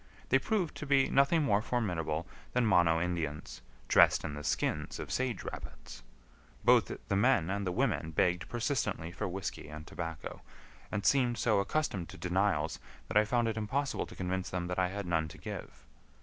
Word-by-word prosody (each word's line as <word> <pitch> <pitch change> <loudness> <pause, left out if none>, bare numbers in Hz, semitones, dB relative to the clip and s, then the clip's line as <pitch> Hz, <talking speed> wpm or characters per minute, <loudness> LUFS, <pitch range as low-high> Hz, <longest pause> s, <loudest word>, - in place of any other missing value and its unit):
They 135 - +5
proved 185 +1 0
to 150 - -6
be 135 -1 +3
nothing 140 +4 +4
more 105 -7 +3
formidable 90 -9 -1 0.3
than 125 -1 +2
Mono 85 -5 +4
Indians 80 -4 -3 0.3
dressed - - +5
in - - -4
the 75 0 -6
skins - - -1
of - - -6
sage 125 -6 -1
rabbits. - - -8 0.6
Both - - +5 0.2
the 100 - 0
men 100 -5 +3
and 100 -1 -2
the - - 0
women 115 -6 0
begged 90 +3 +1
persistently 110 - -1
for 90 - -3
whisky 95 -4 -5
and 75 0 -8
tobacco, 85 -2 -6 0.5
and 105 0 -2
seemed 125 -4 +3
so 110 -5 +2
accustomed 100 - -1
to - - -10
denials 90 -4 0 0.3
that - - +1
I 105 - +6
found 120 +1 +1
it 110 -1 -2
impossible 135 +6 -1
to - - -12
convince 95 0 -2
them 90 -1 -2
that 90 - -1
I 90 - +3
had 100 +2 -4
none 80 -2 +1
to - - -11
give. - - -8
95 Hz, 180 wpm, -32 LUFS, 85-120 Hz, 0.6 s, I